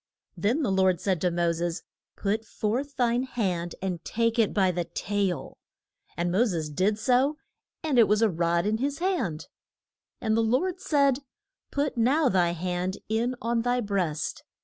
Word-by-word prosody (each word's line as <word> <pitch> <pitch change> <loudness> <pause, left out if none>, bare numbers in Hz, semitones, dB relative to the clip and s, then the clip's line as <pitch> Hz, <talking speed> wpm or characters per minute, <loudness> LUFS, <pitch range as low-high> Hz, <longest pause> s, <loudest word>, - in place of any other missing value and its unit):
Then 245 +10 +1
the 235 - +1
Lord 190 -2 +3
said 185 -3 0
to 180 - +3
Mo 170 0 +1
ses, 170 +1 -3 0.3
Put 215 +2 -1
forth 250 +6 -2
thine 240 -1 +2
hand, 190 -9 -2
and 180 -4 -3
take 230 +1 0
it 220 - +3
by 190 -3 +3
the 175 -1 -2
tail. 185 -3 -2 0.6
And 175 0 0
Mo 195 +7 +4
ses 165 -9 -2
did 195 +7 +1
so, 260 +6 +2 0.5
and 290 -6 +2
it 230 - +7
was 210 +2 +3
a 225 - +5
rod 170 +1 +1
in 215 +1 +1
his 280 +2 -1
hand. 335 - -1 0.7
And 220 0 +1
the 230 - +3
Lord 265 +12 +1
said, 280 -5 +3 0.5
Put 285 -2 -1
now 265 +5 +3
thy 175 -2 +2
hand 180 +2 -2
in 235 +3 0
on 230 0 +1
thy 245 +1 +1
breast. 185 -9 -2
210 Hz, 170 wpm, -27 LUFS, 175-245 Hz, 0.7 s, it